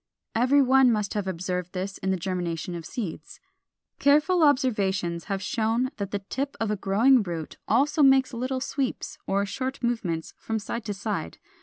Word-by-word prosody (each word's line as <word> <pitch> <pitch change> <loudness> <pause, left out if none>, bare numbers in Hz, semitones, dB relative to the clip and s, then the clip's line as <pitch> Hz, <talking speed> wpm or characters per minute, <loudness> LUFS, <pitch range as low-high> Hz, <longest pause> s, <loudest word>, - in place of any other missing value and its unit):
Every 260 +5 +4
one 265 -1 +5
must 210 -3 -1
have 205 -2 -2
observed 180 0 -3
this 190 +1 -4
in 190 - -2
the 190 - +1
germination 175 -1 -3
of 170 -2 -6
seeds. 170 -9 -6 0.6
Careful 305 +5 +4
observations 200 - +2
have 195 -1 -3
shown 230 +4 0
that 200 -2 -3
the 205 - -1
tip 275 +2 -3
of 225 -2 0
a - - +1
growing 220 +7 +4
root 170 -5 -5
also 285 +7 +2
makes 270 -2 +5
little 255 +2 -2
sweeps 275 -1 -3
or 200 +1 +1
short 260 +6 -4
movements 185 -9 -2
from 225 - -2
side 220 +2 -5
to 205 -2 -3
side. 200 - -4
215 Hz, 170 wpm, -26 LUFS, 190-260 Hz, 0.6 s, one